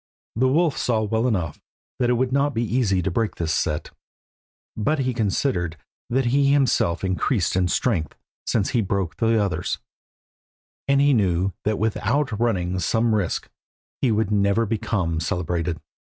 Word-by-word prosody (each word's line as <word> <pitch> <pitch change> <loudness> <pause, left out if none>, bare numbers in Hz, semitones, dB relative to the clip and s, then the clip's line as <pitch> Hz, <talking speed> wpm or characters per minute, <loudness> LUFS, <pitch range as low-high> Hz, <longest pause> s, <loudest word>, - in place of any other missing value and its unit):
The 130 +4 +3
wolf 155 +2 +2
saw 110 -3 +1
well 110 +3 0
enough 90 -10 -2 0.4
that 120 - +2
it - - +4
would 125 +1 0
not 140 0 +1
be 115 - +1
easy 110 -6 +1
to 95 - -1
break 110 +4 -1
this 80 -2 -1
set, 75 - -1 0.8
but 150 +9 0
he 130 -2 0
considered 100 - -1 0.3
that 130 +2 +1
he 140 +4 +3
had 140 - +4
himself 125 - +2
increased 95 +1 0
in 95 -1 +2
strength 85 - 0 0.3
since 105 -1 +1
he 120 -3 +2
broke 95 -4 -2
the 115 -1 +2
others, 100 -3 -1 1.1
and 140 0 +3
he 140 0 +4
knew 95 -4 +1
that 105 0 +1
without 110 +2 0
running 95 -6 0
some 110 +6 +1
risk 100 -5 -1 0.5
he 130 - +3
could 110 -1 +1
never 100 +2 +2
become 100 -7 -1
celebrated. 85 -2 -2
110 Hz, 160 wpm, -23 LUFS, 90-125 Hz, 1.1 s, it